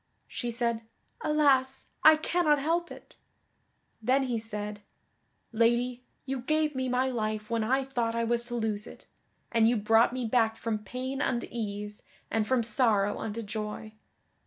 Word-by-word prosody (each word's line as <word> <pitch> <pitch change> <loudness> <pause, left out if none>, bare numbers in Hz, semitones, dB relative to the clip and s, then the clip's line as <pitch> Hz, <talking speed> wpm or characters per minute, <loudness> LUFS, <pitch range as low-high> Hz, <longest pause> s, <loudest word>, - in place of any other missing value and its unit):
She 240 - -4
said, 235 -1 -1 0.4
"Alas 270 -3 +2 0.2
I 315 0 +9
cannot 310 -1 +2
help 335 +4 0
it!" - - -13 0.8
Then 260 +4 +2
he 245 -3 -1
said: 210 -1 -5 0.7
"Lady, 240 +2 +1 0.2
you 270 -1 -3
gave 305 +4 +1
me 260 -1 -2
my 250 +1 +2
life 215 -2 -3
when 230 -1 +1
I 265 +4 +2
thought 235 -4 -1
I 230 - 0
was 235 +1 0
to 240 0 -5
lose 220 -2 -2
it, - - -12 0.5
and 225 -1 +4
you 240 - +2
brought 225 +2 +4
me 255 -1 -3
back 225 -1 +2
from 225 -1 -2
pain 255 +6 -4
unto 240 -4 0
ease, 210 -2 -5 0.3
and 215 -1 +1
from 255 -1 +2
sorrow 215 -3 +2
unto 225 +1 -4
joy. 215 +1 -5
235 Hz, 160 wpm, -29 LUFS, 220-260 Hz, 0.8 s, I